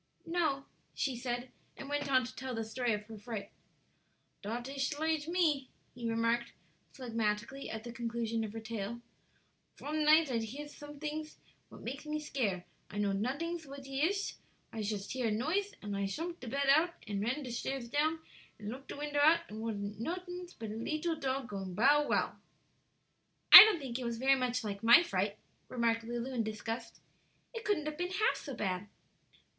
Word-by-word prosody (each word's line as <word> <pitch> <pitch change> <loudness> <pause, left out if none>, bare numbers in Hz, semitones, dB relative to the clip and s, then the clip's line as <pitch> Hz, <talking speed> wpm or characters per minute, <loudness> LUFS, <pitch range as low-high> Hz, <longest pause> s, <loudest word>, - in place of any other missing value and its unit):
"No," 320 -5 0 0.3
she 265 -3 0
said, 245 +1 -3 0.3
and 275 - -7
went 290 0 -1
on 260 -1 +5
to 250 - -9
tell 260 -1 -4
the 225 - -2
story 240 +2 -1
of 210 -1 -2
her 220 -1 -10
fright. 210 -2 -6 0.9
"Dot 235 +4 -4
ish 275 +1 -2
lige 315 -1 0
me," 315 -7 +1 0.2
he 235 -2 -4
remarked, 230 +1 +1 0.4
phlegmatically, 230 +1 -2
at 220 0 -5
the 240 - -6
conclusion 230 -1 -2
of 215 - -4
her 225 - -4
tale. 225 +1 -5 0.8
"Von 305 +1 -2
nighd 310 -1 +6
I 235 - +1
hears 280 +7 -6
somedings 300 +1 -6 0.3
what - - -12
make 270 +5 -5
me 305 0 -1
scare. 220 -12 -2 0.2
I 205 - -7
know 205 -1 +1
notings 295 - -2
what 275 0 -9
he 270 0 -3
ish; 390 +5 0 0.4
I 225 - -3
shust 205 -1 -3
hears 250 -4 0
a - - 0
noise, 375 - -1
an' 205 -1 -4
I 200 0 -1
shumpt 335 - -4
de 255 - -8
bed 275 +4 0
out, 340 +2 +2
and 200 -1 -2
ran 255 +7 -1
de 250 - -6
shtairs 250 +1 -3
down, 310 +5 +1 0.4
and 210 -1 -6
looked 270 +3 -9
de - - -7
window 290 0 -1
out, 320 +3 +6
and 215 - -7
it - - -5
wasn't 205 -2 -4
notings 360 +4 -5
but 220 -2 -5
a - - -4
leetle 310 +8 -2
tog 265 -2 -1
going 195 -3 -5
'Bow 285 +7 +5
wow.'" - - +1 1.1
"I - - +17
don't 435 -4 +2
think 260 -3 -4
it - - -4
was 235 -1 -2
very 265 +3 +4
much 250 -2 0
like 200 -2 -4
my 235 +9 +8
fright," 200 - -1 0.3
remarked 230 -2 +1
Lulu, 240 +3 -4
in 240 - +1
disgust; 220 +2 -5 0.5
"it 455 -1 -5
couldn't 405 -8 0
have 305 +1 -4
been 355 0 -1
half 400 +4 +2
so 275 -4 -6
bad." 190 -2 -2
255 Hz, 190 wpm, -33 LUFS, 225-295 Hz, 1.1 s, I